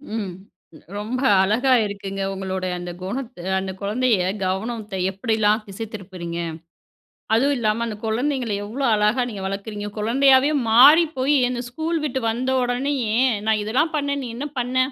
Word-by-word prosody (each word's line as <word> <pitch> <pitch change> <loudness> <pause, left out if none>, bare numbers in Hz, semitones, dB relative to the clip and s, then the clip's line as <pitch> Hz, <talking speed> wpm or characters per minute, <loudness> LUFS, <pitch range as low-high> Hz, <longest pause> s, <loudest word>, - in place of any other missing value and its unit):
ம். 200 -5 -3 0.6
ரொம்ப 225 +5 -3 0.2
அழகா 225 +7 +2
இருக்குங்க 195 -1 -5
உங்களுடைய 190 -1 -3
அந்த 175 0 -6
குணத்து 230 +2 -5 0.2
அந்த 190 0 -4
குழந்தையை 210 -1 +1 0.2
கவனத்தை 210 +2 -3 0.2
எப்படிலா 215 +1 +1 0.2
திசை 200 +3 -6
திருப்புறீங்க. 180 -4 -6 0.9
அதுவும் 275 +6 +3
இல்லாம 225 0 0
அந்த 220 -3 -5
குழந்தைங்களை 245 0 -1
எவ்வளோ 255 +7 -3
அழகா 210 +4 +2
நீங்க 200 -4 -6
வளர்க்குறீங்க, 205 +1 -4
குழந்தையாவே 265 +5 +4 0.2
மாறி 285 +9 +8
போய் 270 +3 +2
என்ன 245 -1 -3
ஸ்கூல் 320 +6 -2
விட்டு 265 -2 -2
வந்தோனேயே, 250 0 0 0.3
"நான் 220 -1 +2
இதெல்லாம் 270 +10 0
பண்ணேன், 285 -1 -1
நீ 245 - -5
என்ன 285 +4 -3
பண்ண?" 250 +1 -2
225 Hz, 135 wpm, -22 LUFS, 200-260 Hz, 0.9 s, மாறி